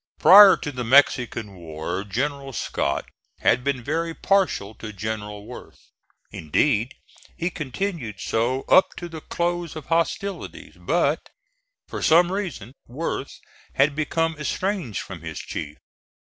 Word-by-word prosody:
Prior 200 +1 +9
to 145 - -5
the 125 -2 -4
Mexican 120 -4 +3
war 80 +3 -5
General 135 +6 -3
Scott 70 -10 -2 0.4
had 125 - +3
been 135 -3 -1
very 165 +4 -2
partial 190 - +1
to 110 0 -8
General 105 0 -5
Worth - - -12 0.4
indeed 110 - 0 0.4
he 170 +2 -1
continued 155 - -4
so 120 +6 -1
up 185 0 +4
to 175 - -5
the 160 -2 -9
close 175 -1 -2
of 155 - -7
hostilities 170 +4 -2
but, - - 0 0.6
for - - -6
some 175 +2 +5
reason, 180 - -4
Worth 140 +8 -4 0.4
had 140 0 +3
become 165 +1 0
estranged 175 - -2
from - - -9
his - - -7
chief. - - -6
140 Hz, 130 wpm, -24 LUFS, 110-170 Hz, 0.6 s, Prior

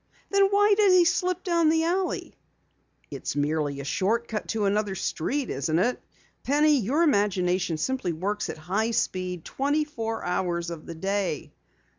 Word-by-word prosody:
"Then 395 0 +5
why 410 +1 +4
did 400 -2 +5
he 360 -1 +6
slip 365 0 0
down 335 -3 +2
the 320 0 +2
alley?" 360 +2 -1 0.8
"It's - - -4
merely 145 -1 -1
a - - -8
short 225 +10 0
cut 215 -2 -4
to 220 -2 -1
another 200 0 0
street, 255 - -2
isn't 150 +4 -1
it? 240 +8 +1 0.4
Penny, 295 +1 +3
your 265 - +1
imagination 185 - +1
simply 195 +1 -1
works 200 +6 -3
at - - -5
high 195 +8 -1
speed 185 -6 -2
twenty 290 +3 0
four 225 -6 -4
hours 175 -1 -1
of 165 -2 -8
the 170 - -6
day." 190 -2 -2
210 Hz, 160 wpm, -26 LUFS, -, 0.8 s, he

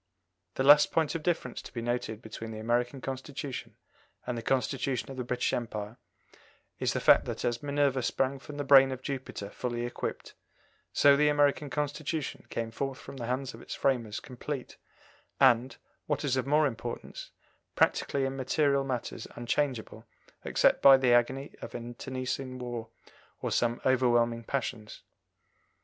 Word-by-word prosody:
The 130 - 0
last 145 +2 +7
point 160 -2 +1
of 165 - -3
difference 160 -7 -2
to - - -11
be 120 - -5
noted 120 -1 -3
between 110 +1 -7
the 110 - -6
American 120 +4 -1
Constitution 135 0 -6 0.5
and 125 - -2
the 115 - -4
Constitution 130 +2 -1
of 135 - -8
the 125 - -2
British 125 +1 -1
Empire 110 -2 -4 0.8
is - - 0
the - - 0
fact - - +6
that - - -4
as 120 +2 -1
Minerva 140 -2 +1
sprang 135 +2 0
from 145 +2 -10
the 145 - -2
brain 135 -1 +7
of 130 0 -6
Jupiter 130 -7 -5
fully 120 -1 -3
equipped, 120 - -5 0.6
so 140 0 +6
the 150 +1 +3
American 145 0 +2
Constitution 150 +1 -3
came 115 -1 -3
forth 135 +3 -3
from 140 - -10
the 120 -2 -5
hands 130 +1 -2
of - - -11
its - - -6
framers 115 -6 0
complete 130 +1 -6 0.6
and, 130 -1 +4 0.3
what 145 0 -1
is 135 -2 +1
of 130 0 -1
more 150 +2 +4
importance, 120 -3 -5 0.5
practically 140 -1 +2
in 135 0 -2
material 140 +1 +1
matters 125 -4 -4
unchangeable 120 -2 -2 0.4
except - - +3
by 135 -1 +9
the 130 -2 +3
agony 130 +4 +1
of - - -8
an 120 -1 -5
internecine 130 +1 -4
war 120 -2 -5 0.5
or - - -3
some 120 0 +1
overwhelming 120 -2 +3
passions. 120 -5 -4
130 Hz, 160 wpm, -29 LUFS, 120-140 Hz, 0.8 s, by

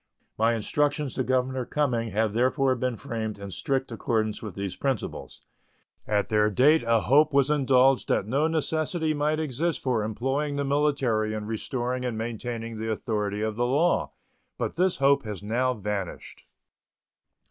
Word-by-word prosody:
My 115 +2 +2
instructions 145 +4 0
to 130 - -1
Governor 130 0 0
Cumming 120 -4 -1
have 110 +1 0
therefore 130 +3 +2
been 125 -1 -2
framed 110 -2 -4
in 100 -1 -8
strict 135 +6 -2
accordance 110 -3 -1
with 105 -5 -7
these 100 -2 -4
principles. 135 -7 -4 0.6
At 105 -1 0
their 105 -1 +3
date 145 +9 +4
a 115 -1 +2
hope 145 +2 +4
was 140 +1 +4
indulged 135 -2 +3
that - - +2
no 140 +8 +1
necessity 160 0 0
might 150 +1 0
exist 155 +2 -1
for 120 -5 0
employing 135 +7 -1
the 140 0 -1
military 135 -7 +1
in 105 -1 -4
restoring 125 +3 -3
and 120 -3 -2
maintaining 115 0 -4
the 110 0 -3
authority 105 -2 -2
of 110 0 -2
the 120 0 +1
law, 150 +7 +1 0.4
but - - -3
this 180 +2 +1
hope 140 +1 +4
has 105 -2 -6
now 125 +4 0
vanished. 100 -3 -5
125 Hz, 160 wpm, -26 LUFS, 110-140 Hz, 0.6 s, date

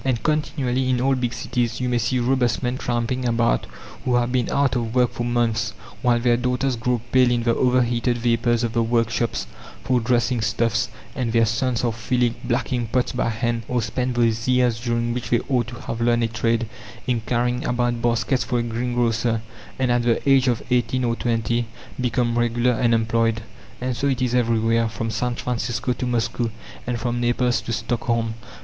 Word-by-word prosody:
And 130 -4 0
continually 135 -4 0
in 125 -1 +2
all 135 +2 +2
big 125 -2 -1
cities 120 -1 -2
you 125 - -1
may 120 -1 +1
see 125 +3 0
robust 125 -1 +1
men 125 +1 -1
tramping 120 +1 -1
about 115 - +1 0.4
who 125 - +1
have 120 0 +1
been 125 -2 0
out 140 -2 +2
of 115 -1 -2
work 125 -1 +3
for 120 - -4
months, 120 -2 0 0.3
while 120 -1 +3
their 120 0 +3
daughters 125 +1 0
grow 120 0 -1
pale 130 -1 +5
in 120 -1 +1
the 115 0 +2
overheated 120 -1 +2
vapours 120 0 +1
of 115 -1 -1
the 115 - +2
workshops 115 0 0 0.4
for 125 -1 +2
dressing 120 0 +1
stuffs, 115 +1 0 0.2
and 120 -3 -2
their 115 -1 +4
sons 120 +2 0
are 120 -2 +1
filling 120 +1 0
blacking 120 0 -1
pots 125 +2 0
by 125 -2 0
hand, 115 +1 -1
or 125 - 0
spend 125 +3 -2
those 115 -1 +1
years 125 -2 +2
during 120 0 -1
which 125 -1 -4
they 120 - +2
ought 125 -4 +1
to 120 - -7
have 115 - -5
learned 120 0 +3
a - - +2
trade, 115 0 0 0.4
in 120 -2 0
carrying 125 +1 0
about 120 -1 0
baskets 120 +2 +1
for 125 - -1
a 120 - +1
greengrocer, 115 -1 0 0.3
and 130 -2 +1
at 120 0 +3
the 120 +3 0
age 135 -1 +5
of 120 -3 +1
eighteen 125 +1 +1
or 115 -1 +1
twenty 115 0 0 0.3
become 120 -1 +1
regular 120 +1 +2
unemployed. 115 -1 +1 0.4
And 125 0 -2
so 140 - 0
it 130 -2 0
is 125 -1 0
everywhere, 115 -1 +2
from 115 +1 -3
San 120 +3 -1
Francisco 120 +1 -2
to 125 - -3
Moscow, 120 0 0 0.4
and 120 -1 -1
from 120 +1 -1
Naples 120 0 +1
to - - -5
Stockholm. 115 -1 -1
120 Hz, 190 wpm, -23 LUFS, 115-125 Hz, 0.4 s, pale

